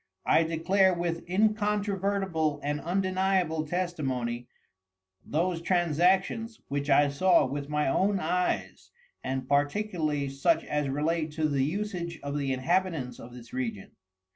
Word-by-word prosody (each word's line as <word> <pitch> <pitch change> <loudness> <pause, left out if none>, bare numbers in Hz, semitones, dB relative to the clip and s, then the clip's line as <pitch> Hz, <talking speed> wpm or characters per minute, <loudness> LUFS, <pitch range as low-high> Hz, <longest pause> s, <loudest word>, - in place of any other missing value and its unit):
I 165 - +4
decalre 180 +3 +2
with 170 0 -3
incontrovertible 200 -5 0
and 145 +1 -2
undeniable 185 -3 0
Testimony, 135 -9 -2 0.8
those 165 +2 -1
Transactions, 185 +6 +1
which 140 +1 -2
I 145 +1 +5
saw 150 +3 +4
with 140 +2 -4
my 150 0 0
own 195 +8 +2
Eyes, 180 +2 -1 0.3
and 130 0 -3
particularly 150 0 0
such 135 - +1
as 150 -2 -1
relate 155 +2 -1
to 155 0 +1
the 140 -3 +1
usage 175 0 -3
of 140 0 -3
the 140 -2 -1
Inhabitants 155 -2 -1
of 120 - -10
this 120 -2 -12
Region. 115 -6 -4
160 Hz, 125 wpm, -28 LUFS, 140-185 Hz, 0.8 s, I